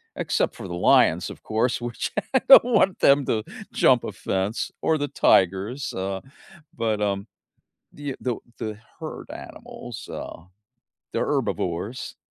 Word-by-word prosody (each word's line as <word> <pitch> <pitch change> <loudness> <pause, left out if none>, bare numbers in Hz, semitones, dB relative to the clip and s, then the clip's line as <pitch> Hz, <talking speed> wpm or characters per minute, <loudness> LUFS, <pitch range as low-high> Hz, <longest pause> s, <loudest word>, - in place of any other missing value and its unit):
except - - 0
for 105 -5 -8
the - - -5
lions, 85 - +4
of - - -11
course, 115 +3 0
which 120 -1 -3 0.2
I 265 - +5
don't 270 - +10
want 210 -6 +2
them 140 0 +5
to 110 -3 0 0.3
jump - - +4
a - - -5
fence 95 +4 -2
or 160 - +2
the 145 -1 -2
tigers, 100 +3 +2
uh, 95 0 -3 0.6
but, 110 -2 0
um, 100 -1 -1 0.7
the 145 -2 -5
the 125 -3 -1 0.2
the 110 -1 -5 0.2
herd - - -7
animals, 120 -4 -9
uh, 80 - -7 0.7
they're - - 0
herbivores, 90 +8 -2
110 Hz, 140 wpm, -24 LUFS, 100-135 Hz, 0.7 s, don't